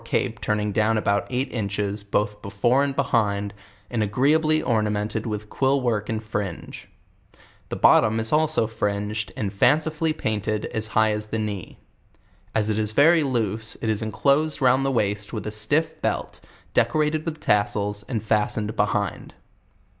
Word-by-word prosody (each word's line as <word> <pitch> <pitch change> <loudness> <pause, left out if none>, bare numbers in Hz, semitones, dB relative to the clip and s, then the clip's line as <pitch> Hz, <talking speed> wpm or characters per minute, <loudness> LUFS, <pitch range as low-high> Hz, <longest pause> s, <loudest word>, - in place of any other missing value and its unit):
ipo - - -2
turning 105 -1 0
down 110 +1 +2
about 100 -1 0
eight 130 +2 -2
inches, 100 -2 -2
both 105 +1 -1
before 115 +7 +1
and 140 -1 -2
behind, 105 -7 0 0.3
and 120 -2 -2
agreeably 150 +9 +2
ornamented 105 -2 -1
with 105 -1 -4
quill 135 +5 +1
work 110 -5 -1
and 110 0 -2
fringe; 105 -5 -5 0.8
the - - -3
bottom 110 +1 +4
is 110 0 0
also 155 -4 +3
fringed 105 0 -2
and 100 -2 -2
fancifully 155 +8 +2
painted 110 -5 -2
as 110 0 -2
high 110 0 +4
as 105 0 -3
the 110 - -3
knee. 105 -5 -4 0.8
As 110 -1 +2
it 110 0 0
is 110 0 -1
very 160 +6 +5
loose, 110 -5 -1
it 110 - -2
is 110 0 0
enclosed 140 +8 +1
round 130 0 +3
the 135 - +1
waist 105 -5 -1
with 110 - -4
a 105 - -3
stiff 155 +9 -1
belt, - - -2 0.3
decorated 155 0 +1
with 160 -1 -5
tassels, 105 0 0
and 115 -5 -3
fas 110 0 +1
tened 105 +1 -3
behind. 105 -2 -1
110 Hz, 160 wpm, -24 LUFS, 105-135 Hz, 0.8 s, very